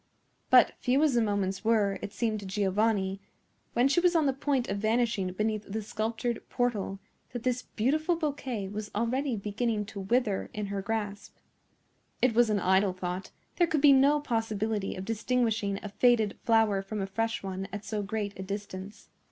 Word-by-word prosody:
But - - +7
few 265 +4 +2
as 300 -4 +3
the 240 - +3
moments 200 -3 -1
were, 215 -3 +2
it - - -5
seemed 215 +1 -1
to 200 - -9
Giovanni, 195 0 0 0.5
when 245 +2 +4
she 275 +5 +3
was 355 0 +3
on 320 -2 +4
the 270 - +2
point 270 -2 0
of 200 +1 -2
vanishing 220 -3 +1
beneath 215 +1 -1
the 220 +1 -3
sculptured 225 +2 -2
portal, 220 -5 -1 0.4
that 245 -1 -5
his 250 0 +1
beautiful 310 +9 +1
bouquet 270 -10 -3
was 210 +1 -5
already 250 +4 0
beginning 210 +1 -1
to 200 0 -8
wither 210 +1 0
in 210 -1 -2
her 195 - -2
grasp. 205 -1 -4 0.8
It 255 -2 +3
was 235 0 +4
an 210 -1 +2
idle 190 +1 +3
thought; 180 +1 -4 0.3
there 345 - +4
could 315 -3 0
be 285 -1 +8
no 280 +2 +5
possibility 220 -5 -1
of 185 - -6
distinguishing 225 -3 0
a 210 - -5
faded 225 -1 +3
flower 225 -4 +3
from 210 +2 -5
a 195 - -1
fresh 225 +3 -2
one 190 0 -4
at 205 +1 -6
so 215 -2 -2
great 205 0 -3
a - - -3
distance. 200 +1 -7
215 Hz, 180 wpm, -29 LUFS, 200-245 Hz, 0.8 s, be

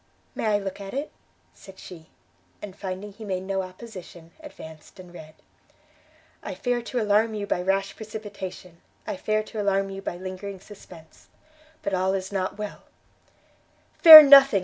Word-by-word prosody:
"May - - -4
I 210 -1 +2
look 195 -1 -7
at 195 +4 -9
it?" 285 +3 -4 0.4
said 195 -1 -16
she; 165 -3 -13 0.5
and, 200 -3 -10
finding 195 +1 -7
he 220 - -13
made 185 -3 -4
no 195 0 -3
opposition, 185 -3 -12
advanced 160 - -14
and 180 -1 -14
read. 155 -2 -13 1.1
_I - - -7
fear 245 -1 -2
to 245 +1 -4
alarm 215 +1 +1
you 205 -1 -4
by 180 - -2
rash 195 +1 -2
precipitation, 200 -5 -10 0.2
I 210 - -5
fear 215 +3 -2
to 215 0 -7
alarm 195 -1 -1
you 195 0 -8
by 185 - -6
lingering 185 +1 -8
suspense, 180 -5 -16 0.6
but 200 - -3
all 190 +1 0
is 190 0 -5
not 190 0 -4
well 210 -1 -7 1.2
_ - - -33
"Fear 315 -3 +13
nothing!" 275 -6 +7
195 Hz, 165 wpm, -24 LUFS, 185-215 Hz, 1.2 s, Fear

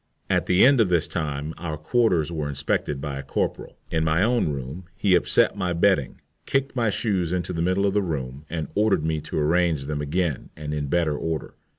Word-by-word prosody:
At - - +1
the 90 +5 +5
end 135 -2 +6
of 100 - +2
this 85 -2 +2
time 75 -1 -3
our 80 -2 -4
quarters 85 - +1
were 75 -3 -3
inspected 70 0 -1
by 70 -2 -4
a - - -3
corporal. 70 - -3
In 80 -1 +1
my 80 +3 +2
own 120 -6 +2
room 70 +5 -5
he 100 -1 +2
upset 90 - +3
my 90 -1 -1
bedding, 85 -5 +2 0.3
kicked 135 0 0
my 115 -4 +2
shoes 95 -5 0
into 90 0 -2
the 85 - -2
middle 95 +3 +1
of 100 - +1
the 105 - +2
room, 70 -6 -4
and 80 -3 -3
ordered 105 -6 +2
me 80 -1 -1
to - - -5
arrange 80 -1 +2
them 75 0 -3
again 75 -1 -1
and 75 -1 -5
in 75 -1 -2
better 80 0 +1
order. 80 0 -3
80 Hz, 210 wpm, -24 LUFS, 75-95 Hz, 0.3 s, end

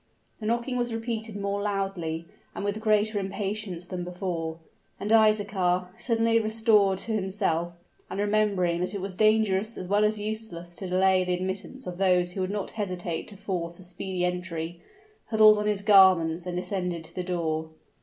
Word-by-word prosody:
The 215 - -4
knocking 240 +2 0
was 240 -1 0
repeated 225 -2 -4
more 200 0 -2
loudly 195 -5 -2 0.3
and - - -4
with 205 +1 -1
greater 215 -1 +2
impatience 195 -2 -4
than 180 -1 -5
before; 175 -3 -4 0.4
and 210 - -3
Isaachar, 200 -5 +3
suddenly 230 -1 +2
restored 215 -3 +3
to 225 - -5
himself, 190 -5 0 0.4
and - - -4
remembering 205 -4 +1
that 185 +3 -2
it - - -2
was 190 -1 -4
dangerous 215 0 +2
as 185 - -5
well 205 +2 +3
as 210 0 +2
useless 205 -5 -5
to 190 - -5
delay 185 0 +3
the 180 0 0
admittance 190 +8 -4
of 180 0 -6
those 180 -2 +3
who 190 - -4
would 185 - -1
not 205 -1 -3
hesitate 180 -5 -3
to 200 - -9
force 170 -3 -3
a 185 - -13
speedy 180 0 -3
entry, 175 -2 -4 0.5
huddled 215 -1 +6
on 210 - -1
his 205 -1 0
garments, 185 -4 +5
and 175 0 -3
descended 180 -2 -2
to - - -11
the 180 - -3
door. 160 -3 -2
195 Hz, 175 wpm, -27 LUFS, 180-215 Hz, 0.5 s, huddled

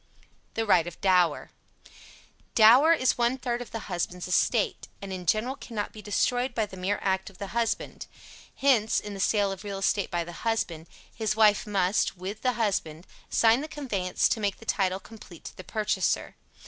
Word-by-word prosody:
THE 225 - 0
RIGHT 175 -5 +4
OF 175 - -8
DOWER. 180 -5 +2 1.0
Dower 245 +8 +7
is 260 -6 +2
one 240 +2 +2
third 245 -1 -3
of 245 - -8
the 225 - -5
husband's 180 -1 -4
estate, 205 +4 +1
and 195 -1 -7
in 180 -2 -7
general 230 +8 +1
cannot 220 -6 -5
be 215 - -10
destroyed 245 +5 0
by 220 - +1
the 190 - -12
mere 190 +2 -1
act 190 0 0
of 195 - -18
the 200 0 -6
husband. 235 -1 -2 0.5
Hence, 250 -6 +3
in 210 - -7
the 195 - -7
sale 200 0 +2
of 195 +1 -7
real 200 -1 -5
estate 195 +1 0
by 175 -1 -1
the 170 - -9
husband, 175 -8 -2 0.3
his 215 -2 -1
wife 215 -1 +4
must, 195 -1 +1
with 195 +4 -6
the 255 -1 +1
husband, 190 -7 -2 0.2
sign 230 +3 +4
the 305 - -5
conveyance 210 -12 -1
to - - 0
make 205 -2 -1
the 225 - -14
title 190 -3 0
complete 195 -5 -14
to - - -9
the 185 - -10
purchaser. 215 +3 -1
210 Hz, 185 wpm, -27 LUFS, 185-230 Hz, 1.0 s, Dower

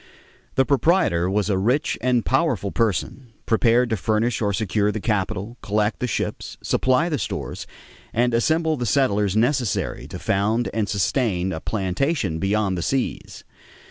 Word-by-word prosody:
The 135 - +3
proprietor 140 - +2
was 100 +1 0
a 95 -3 +1
rich 125 +9 +1
and 125 -1 +1
powerful 130 - +1
person, 115 +7 -1 0.2
prepared 120 +2 +3
to 110 - +1
furnish 110 +7 0
or 105 -2 +1
secure 105 0 0
the 110 - -4
capital, 105 +2 -2
collect 105 +2 0
the 125 - -1
ships, 110 - -3
supply 130 +6 +2
the 155 -6 -1
stores, 100 - -5 0.4
and 120 +1 +1
assemble 160 +6 +2
the 120 -2 -2
settlers 105 -7 +2
necessary 120 -1 0
to - - -7
found 110 +4 0
and 110 -2 -1
sustain 95 -2 0
a 80 - -4
plantation 95 - -1
beyond 95 -1 0
the - - -2
seas. 130 +8 -3
110 Hz, 150 wpm, -23 LUFS, 100-125 Hz, 0.4 s, The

